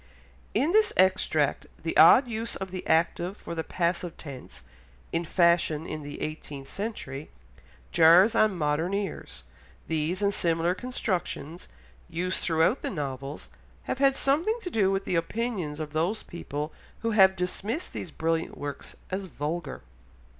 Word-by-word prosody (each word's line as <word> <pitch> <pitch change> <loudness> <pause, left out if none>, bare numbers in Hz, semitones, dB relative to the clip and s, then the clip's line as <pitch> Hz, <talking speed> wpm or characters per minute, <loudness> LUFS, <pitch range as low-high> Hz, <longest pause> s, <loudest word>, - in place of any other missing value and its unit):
In 275 +9 +2
this 435 +2 +4
extract 185 0 +2 0.2
the - - -2
odd 260 - +8
use 230 0 -3
of 190 -1 -6
the 185 -1 -6
active 170 +4 +1
for - - -7
the 165 -1 -2
passive 170 0 -1
tense, 130 - -10 0.5
in 170 +1 0
fashion 170 -2 +2
in 155 -2 -5
the 145 0 -8
eighteenth 145 -3 -6
century, 155 - -5 0.6
jars 170 +6 +7
on 215 -4 +3
modern 160 +4 0
ears, 200 -4 -5 0.4
these 165 +5 -1
and 200 0 +2
similar 170 0 +1
constructions, 180 - -4 0.4
used 180 +2 -1
throughout 165 +9 +2
the - - -2
novels, 140 - -5 0.3
have - - -3
had 275 -1 +4
something 320 - +2
to 360 - -5
do 200 -7 +3
with 195 0 -1
the - - -2
opinions 170 -3 -2
of 155 -1 -5
those 175 +8 0
people 150 -2 -5 0.3
who 230 - +1
have 190 -3 +6
dismissed 200 - -3
these - - -5
brilliant 165 +1 -2
works 145 -1 -6 0.2
as 190 +1 -2
"vulgar." 165 +1 -4
175 Hz, 145 wpm, -27 LUFS, 155-205 Hz, 0.6 s, odd